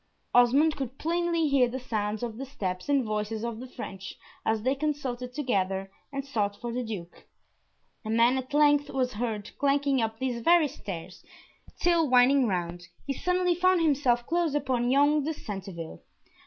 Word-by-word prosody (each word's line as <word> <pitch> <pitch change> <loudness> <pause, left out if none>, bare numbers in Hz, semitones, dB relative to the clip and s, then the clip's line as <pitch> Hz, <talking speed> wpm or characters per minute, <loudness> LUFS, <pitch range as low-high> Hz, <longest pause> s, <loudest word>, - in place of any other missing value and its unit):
Osmond 275 +6 +5
could 270 -2 -5
plainly 335 0 0
hear 275 -3 +4
the 260 +2 -4
sounds 215 -3 -3
of 225 -2 -4
the 270 - -4
steps 190 -7 -4
and 280 -2 +3
voices 215 0 -3
of 230 -1 -4
the 255 - -7
French 195 -6 -8 0.3
as 220 -1 0
they 260 +2 +2
consulted 275 -4 -3
together, 195 -8 -1 0.2
and 275 -1 -4
sought 210 -7 -1
for 240 -1 -4
the 250 +1 -2
Duke. 200 -7 -8 0.8
A 215 - -6
man 230 +3 +4
at 260 +1 -8
length 290 0 +4
was 255 -2 -1
heard 215 -1 -3
clanking 280 -1 +2
up 225 0 -2
these 245 -1 -2
very 335 +3 +5
stairs, 180 -7 -8 0.6
till 335 -4 +3
winding 255 +1 +5
round, 175 -2 -3 0.2
he 275 - -1
suddenly 360 +4 +1
found 370 +1 +3
himself 260 -6 +2
close 335 -1 0
upon 255 -4 0
young 290 +3 +4
de 315 +2 -2
Centeville. 190 - -7
250 Hz, 170 wpm, -28 LUFS, 220-285 Hz, 0.8 s, Osmond